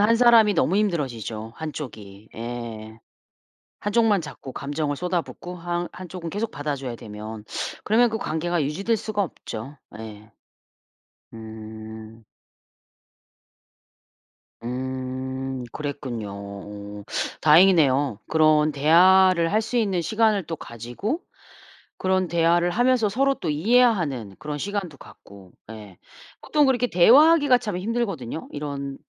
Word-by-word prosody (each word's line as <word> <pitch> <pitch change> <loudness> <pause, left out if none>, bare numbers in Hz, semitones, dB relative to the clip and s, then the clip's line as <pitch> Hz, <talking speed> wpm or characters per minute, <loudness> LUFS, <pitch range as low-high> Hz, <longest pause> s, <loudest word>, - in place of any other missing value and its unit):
한 220 +3 +4
사람이 230 -3 +6
너무 180 +2 +2
힘들어지죠. 120 - -2
한 160 -1 -5
쪽이 105 -8 -9
예. 115 -2 -7 0.8
한 205 - -3
쪽만 220 -4 +3
자꾸 140 -4 -9
감정을 145 +1 -2
쏟아붓고 180 +1 -4
한 175 0 -3
한 185 - -9
쪽은 170 -1 -6
계속 210 +5 -3
받아 145 0 -3
줘야 130 -3 -6
되면 110 -1 -8 0.4
그러면 235 +3 +4
그 220 - -2
관계가 170 -2 -1
유지될 195 +11 0
수가 210 -1 -1
없죠 135 - -8 0.2
예. 110 0 -10 1.0
음. 110 0 -10 2.4
음 130 +1 -4
그랬군요. 135 -8 -5
어 100 +1 -9 0.4
다행이네요. 150 - +5
그런 155 -1 +4
대화를 170 +4 +5
할 215 +1 +3
수 250 - -2
있는 200 -6 +1
시간을 215 +1 +1
또 165 - -4
가지고 120 - -5 0.8
그런 185 0 +1
대화를 170 +1 +2
하면서 245 +2 +3
서로 270 +7 +1
또 170 - -4
이해하는 165 - +2
그런 150 -1 -5
시간도 190 -3 -4
갖고 100 -6 -15 0.2
예. 105 -5 -11 0.4
보통 300 -1 +2
그렇게 250 -2 +2
대화하기가 280 - +6
참 210 -7 -4
힘들거든요. 195 - -3
이런 140 -2 -5
155 Hz, 255 characters per minute, -24 LUFS, 120-200 Hz, 2.4 s, 사람이